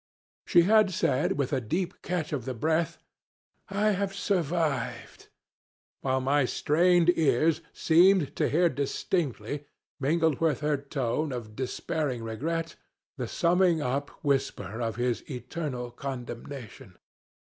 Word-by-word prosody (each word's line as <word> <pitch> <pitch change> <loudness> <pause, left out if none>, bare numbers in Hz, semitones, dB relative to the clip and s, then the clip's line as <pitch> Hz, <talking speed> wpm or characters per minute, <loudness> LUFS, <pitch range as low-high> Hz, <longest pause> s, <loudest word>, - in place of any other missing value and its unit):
She 175 - +6
had 215 +2 +5
said, 145 -4 +1
with 140 -3 -1
a 130 - +1
deep 170 - -3
catch 175 -4 -2
of 130 -5 -3
the 130 - -3
breath, 160 +6 0 0.7
'I 205 +2 +2
have 195 0 -1
survived;' 165 - -1 0.7
while 130 -1 0
my 140 +2 +2
strained 175 +6 +3
ears 155 +1 +2
seemed 175 -1 +4
to - - +2
hear 175 +4 +4
distinctly, 145 - -2 0.3
mingled 160 +1 +1
with 160 -2 +1
her 150 -1 +1
tone 140 +1 -2
of 115 -4 -6
despairing 130 0 -2
regret, 160 +9 -3 0.4
the 125 -3 -3
summing 175 +3 +3
up 140 +1 -1 0.2
whisper 135 -5 -1
of 115 -2 -2
his 120 0 0
eternal 125 -1 -4
condemnation. 125 -4 -7
145 Hz, 125 wpm, -28 LUFS, 125-170 Hz, 0.7 s, She